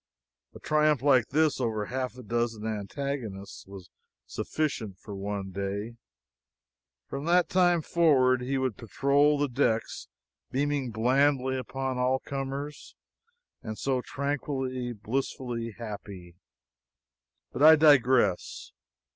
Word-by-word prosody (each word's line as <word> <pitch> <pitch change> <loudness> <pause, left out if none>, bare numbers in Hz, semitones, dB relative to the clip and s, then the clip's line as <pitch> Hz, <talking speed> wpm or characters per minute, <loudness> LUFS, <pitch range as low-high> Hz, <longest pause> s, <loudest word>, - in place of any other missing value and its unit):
A - - -9
triumph 150 -3 +2
like 130 -5 +4
this, 155 -1 +1
over 110 -3 -1
half 130 0 -4
a 125 - -9
dozen 115 0 -2
antagonists 110 -1 -5
was 95 -2 -11 0.3
sufficient 115 -11 -3
for 100 +1 -9
one 100 0 -4
day; 100 +4 -4 1.1
from 140 +2 -6
that 175 +1 +3
time 175 -3 +3
forward 130 -8 +3
he 135 +2 -1
would 130 -4 -1
patrol 140 +6 +2
the 145 0 +1
decks 120 -3 -1 0.4
beaming 140 -1 -1
blandly 130 +4 +2
upon 130 0 -3
all 130 +1 +2
comers, 140 +2 -6 0.7
and 110 -1 -6
so 130 -2 0
tranquilly, 135 -3 -3
blissfully 115 0 -4
happy! 100 -6 -8 1.2
But 125 - -5
I 160 +1 +9
digress. 130 - +3
130 Hz, 115 wpm, -28 LUFS, 110-140 Hz, 1.2 s, I